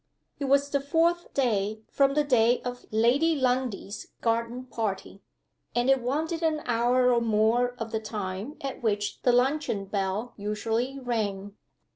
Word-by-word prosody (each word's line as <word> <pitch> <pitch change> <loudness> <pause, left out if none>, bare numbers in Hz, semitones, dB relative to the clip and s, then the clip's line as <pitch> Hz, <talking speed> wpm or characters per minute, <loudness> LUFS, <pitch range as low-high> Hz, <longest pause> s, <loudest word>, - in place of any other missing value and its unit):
It 280 - -2
was 280 +1 +2
the 280 - +2
fourth 330 +5 +1
day 215 -5 0
from 275 0 +3
the 300 - +3
day 245 -3 +3
of 245 0 -6
Lady 255 +9 +3
Lundie's 250 -6 -1
garden 230 +2 -1
party, 205 -5 -4 0.5
and 245 +2 +3
it 270 -1 +3
wanted 315 +7 -1
an 315 -2 0
hour 245 +1 +3
or 235 - +2
more 230 +3 +2
of 225 -1 -5
the 220 - -1
time 210 +5 -5
at 275 -1 -5
which 205 -3 -1
the 250 - +4
luncheon 250 -4 +1
bell 195 +4 -2
usually 225 +5 -2
rang. 205 -6 -3
245 Hz, 150 wpm, -27 LUFS, 215-270 Hz, 0.5 s, the